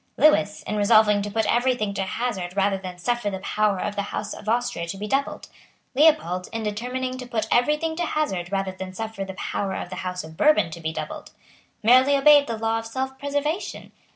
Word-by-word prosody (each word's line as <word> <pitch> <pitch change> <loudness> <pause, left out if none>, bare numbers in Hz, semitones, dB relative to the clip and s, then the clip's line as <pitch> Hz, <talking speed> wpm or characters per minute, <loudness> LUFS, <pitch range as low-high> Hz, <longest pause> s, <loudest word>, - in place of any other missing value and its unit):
Lewis, 210 -9 +3
in 210 - -3
resolving 210 0 +5
to 205 - -4
put 220 +2 0
every 250 +2 +2
thing 210 -4 -2
to 195 - -2
hazard 190 -3 -3
rather 195 0 +2
than 185 -1 -7
suffer 240 +3 -1
the 190 - -4
power 205 +1 0
of 205 - -3
the 200 - 0
House 205 +1 -4
of 215 - -7
Austria 230 -7 -1
to 195 - -5
be 205 - -5
doubled; 275 +6 -2 0.5
Leopold, 270 - +3
in 225 -1 -4
determining 250 +4 -3
to 250 - -7
put 220 -3 -2
every 295 +5 +3
thing 320 +1 -2
to 350 - 0
hazard 190 - -2
rather 195 -1 -1
than 185 0 -8
suffer 220 0 -5
the 190 -1 -7
power 195 +1 -3
of - - -5
the 185 - -5
House 180 0 -4
of 160 0 -11
Bourbon 210 - +3
to 170 - -7
be 160 0 -2
doubled; - - -6 0.5
merely 255 +5 +6
obeyed 290 0 +6
the 230 - -3
law 225 +1 0
of 225 - -7
self 265 +3 -4
preservation. 290 +5 -3
215 Hz, 215 wpm, -24 LUFS, 195-255 Hz, 0.5 s, merely